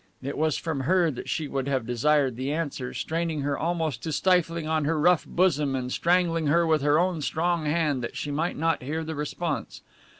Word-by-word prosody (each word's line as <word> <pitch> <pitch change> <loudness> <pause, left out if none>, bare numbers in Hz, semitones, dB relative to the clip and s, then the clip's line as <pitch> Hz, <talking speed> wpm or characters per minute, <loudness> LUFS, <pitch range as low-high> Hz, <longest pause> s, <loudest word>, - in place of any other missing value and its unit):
it 140 +2 -4
was 155 -1 +1
from 160 -4 -3
her 170 +4 +2
that 125 - -7
she 155 -3 -1
would 135 -1 -3
have 130 -4 0
desired 130 +2 +2
the 130 +3 -3
answer, 145 -5 -3
straining 160 +3 -2
her 140 0 -1
almost 160 -7 -2
to 160 - -4
stifling 165 +1 +1
on 155 -1 +1
her 155 +2 0
rough 175 +2 +3
bosom 150 -6 +1
and 125 -1 -3
strangling 170 -1 +2
her 170 +4 +3
with 160 -2 +2
her 145 +1 +3
own 175 -2 +1
strong 165 +1 0
hand 150 -4 +1
that - - -5
she 145 - -3
might 160 +5 -1
not 165 +1 +1
hear 155 +5 -3
the 160 0 -4
response. 150 +1 -4
155 Hz, 205 wpm, -26 LUFS, 140-165 Hz, -, rough